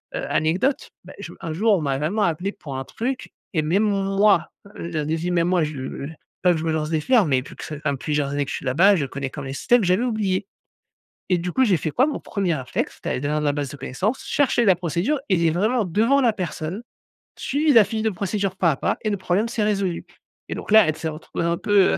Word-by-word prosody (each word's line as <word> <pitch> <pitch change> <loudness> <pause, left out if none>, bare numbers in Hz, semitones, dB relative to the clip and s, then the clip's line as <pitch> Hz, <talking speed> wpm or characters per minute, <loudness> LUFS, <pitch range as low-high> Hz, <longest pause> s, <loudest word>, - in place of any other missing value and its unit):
heu, - - -3
anecdote, 185 - +1
bah, - - -12
j - - -7
un 165 -4 -4
jour 215 +6 +3
on 165 - -3
m'a 135 -2 -1
vraiment 195 +8 0
appelé 175 +3 0
pour 140 -9 -8
un 135 - -3
truc 250 - -4 0.2
et 155 - +2
même 175 +8 +1
moi 195 -3 +2 0.3
leur 160 -3 -3
disi 160 +3 -1
même 175 0 +1
moi 180 -3 +2
je 140 -2 -5
j 160 - -9 0.3
pas 180 - +5
que 170 - +1
je 160 - -4
me 160 - 0
lance 155 -1 -1
des 160 -1 +1
fleurs 225 - +3
mais 135 -4 +2
vu 135 - -12
que - - -9
ça 155 - -6
ça 150 - -1
m - - -1
fait - - -9
plusieurs 150 -2 0
années 145 0 0
que 140 - -6
je - - -2
suis - - -9
là-bas, 180 +10 +5
je 145 - 0
connais 135 +1 -5
comme 140 +1 -7
même 135 - -6
les - - -4
systèmes, 240 - +3
j'avais 185 +6 +2
oublié 210 -6 0 0.8
et 180 -2 +3
du 180 +1 -3
coup, 260 +8 +3
j'ai 195 -6 +3
fait 155 - -3
quoi? 255 - +3
Mon 300 - -2
1er 195 -5 -1
réflexe 130 -5 -3
c'est - - -2
d'aller - - -9
dans 150 - +1
la 145 -1 +1
base 145 -2 -3
de 145 - -9
connaissance, 185 - -2
chercher 260 -4 +2
la 190 -3 +6
procédure 175 - -1
et 190 - +4
lire 165 -2 +2
vraiment 220 +7 +1
devant 225 +10 +2
la 240 -3 +4
personne, 180 +1 -4 0.5
suivi 295 +3 +1
la 225 -4 +7
fiche 220 +2 -3
de 220 - +1
procédure 195 0 -2
pas 170 -3 +3
à - - -1
pas - - -1
et 215 - 0
le 205 - 0
problème, 190 +4 0
s'est 230 -2 -1
résolu 195 -4 -1 0.4
et - - -3
donc - - -7
là, 220 -1 +8
elle 155 - -2
s'est 160 - -4
retrouvée 155 +2 -5
dans 170 - +1
un - - -2
peu, 205 0 +3
heu, - - +1
180 Hz, 270 wpm, -23 LUFS, 155-210 Hz, 0.8 s, là